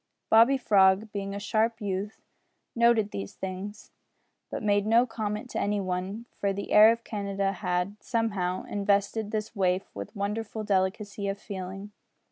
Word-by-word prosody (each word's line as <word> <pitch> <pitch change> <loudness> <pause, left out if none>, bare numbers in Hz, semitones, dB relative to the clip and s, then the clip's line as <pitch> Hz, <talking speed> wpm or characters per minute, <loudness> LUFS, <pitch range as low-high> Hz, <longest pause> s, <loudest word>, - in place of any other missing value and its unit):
Bobby 230 +5 +6
Frog, 200 -2 +4
being 200 -1 -4
a - - -4
sharp 225 +2 0
youth, 200 0 -4 0.5
noted 235 -3 +3
these 100 0 -6
things, 190 +2 -6 0.6
but - - -5
made 205 0 +2
no 230 +3 +5
comment 215 -1 -4
to - - -2
any 205 0 0
one, 190 +4 -3
for 200 - +1
the 200 +1 -5
air 215 +1 +8
of 230 0 -3
Canada 200 -2 -2
had, 180 +1 -2
somehow, 200 -6 -1
invested 205 +1 0
this 215 +1 -3
waif 185 -1 0
with 100 0 -8
wonderful 210 +2 -3
delicacy 200 +1 -1
of 195 0 -2
feeling. 195 +1 -7
205 Hz, 150 wpm, -28 LUFS, 195-220 Hz, 0.6 s, air